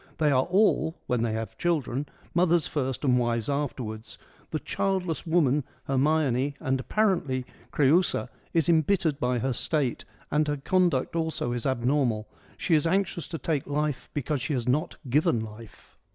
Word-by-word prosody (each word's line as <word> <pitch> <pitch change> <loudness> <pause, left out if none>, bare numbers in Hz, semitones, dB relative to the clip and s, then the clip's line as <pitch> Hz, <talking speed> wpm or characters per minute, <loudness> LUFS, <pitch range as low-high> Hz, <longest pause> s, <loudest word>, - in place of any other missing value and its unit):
They 150 -2 +3
are 130 -1 +3
all 185 -3 +2
— - - -42
when 125 -2 0
they 115 -2 0
have 110 0 -5
children 145 -5 0
— - - -28
mothers 175 -2 +3
first 135 -1 -2
and 125 -2 +4
wives 120 +1 0
afterwards; 120 -6 -4 0.3
the 155 - -1
childless 180 -1 -2
woman 150 -4 +3
— - - -33
Hermione' 150 +4 +2
and, 125 -3 +1
EURIPIDES 140 +2 -2
95 135 -4 0
apparently, 170 -8 0 0.3
Creiisa 155 +6 +2
— - - -34
is 150 - -4
embittered 160 -2 +2
by 125 0 +1
her 130 +2 0
state 135 -1 -1 0.3
and 150 0 +2
her 145 0 0
conduct 170 -2 +1
also 160 -7 -1
is 120 0 -1
abnormal: 125 -4 +1 0.3
she 170 - 0
is 155 0 +4
anxious 180 -1 0
to 165 - -5
take 150 -3 -2
life 145 -2 -2
because 145 -1 -1
she 135 +4 -2
has 125 -3 -2
not 150 +7 +1
given 125 -2 +2
life. 110 0 -11
145 Hz, 180 wpm, -27 LUFS, 125-160 Hz, 0.3 s, and